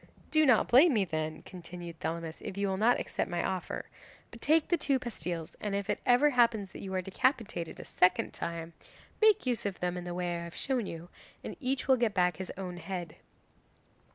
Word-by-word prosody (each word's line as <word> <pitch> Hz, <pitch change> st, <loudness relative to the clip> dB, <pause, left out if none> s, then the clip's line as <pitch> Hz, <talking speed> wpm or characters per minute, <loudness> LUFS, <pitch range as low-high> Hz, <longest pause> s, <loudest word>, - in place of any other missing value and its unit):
"Do 310 Hz, -1 st, +5 dB
not 245 Hz, -4 st, +5 dB
blame 275 Hz, +4 st, +6 dB
me 205 Hz, -3 st, +3 dB
then," 155 Hz, -2 st, -3 dB
continued 175 Hz, -1 st, -9 dB
Thelamis, 165 Hz, 0 st, -4 dB
"if 190 Hz, -, -6 dB
you 200 Hz, 0 st, +1 dB
will 190 Hz, -, -1 dB
not 230 Hz, +4 st, +4 dB
accept -, -, -2 dB
my 175 Hz, 0 st, -1 dB
offer. 185 Hz, -2 st, -3 dB, 0.5 s
But 235 Hz, -, -12 dB
take 310 Hz, +1 st, +3 dB
the 345 Hz, -, +4 dB
two 285 Hz, -4 st, +1 dB
pastilles, 175 Hz, -10 st, -5 dB
and 205 Hz, -2 st, -2 dB
if 200 Hz, 0 st, -1 dB
it -, -, -2 dB
ever 255 Hz, +4 st, +5 dB
happens 230 Hz, -6 st, +3 dB
that -, -, -9 dB
you 190 Hz, -, -6 dB
are 185 Hz, -, 0 dB
decapitated 205 Hz, -, -1 dB
a -, -, -8 dB
second 180 Hz, 0 st, +2 dB
time, 170 Hz, 0 st, -5 dB, 0.5 s
make 435 Hz, -7 st, +5 dB
use 245 Hz, -3 st, 0 dB
of 200 Hz, -3 st, -3 dB
them 180 Hz, 0 st, -1 dB
in 180 Hz, -, -5 dB
the 175 Hz, 0 st, -5 dB
way 175 Hz, -1 st, -2 dB
I -, -, -5 dB
have 170 Hz, 0 st, -9 dB
shown 250 Hz, -6 st, -1 dB
you, 165 Hz, +1 st, -7 dB, 0.3 s
and -, -, -6 dB
each 265 Hz, -1 st, -1 dB
will 265 Hz, -1 st, +5 dB
get 235 Hz, -4 st, +1 dB
back 180 Hz, -3 st, +2 dB
his 190 Hz, -, -5 dB
own 180 Hz, -2 st, -5 dB
head." 175 Hz, -3 st, -6 dB
190 Hz, 210 wpm, -31 LUFS, 175-245 Hz, 0.5 s, blame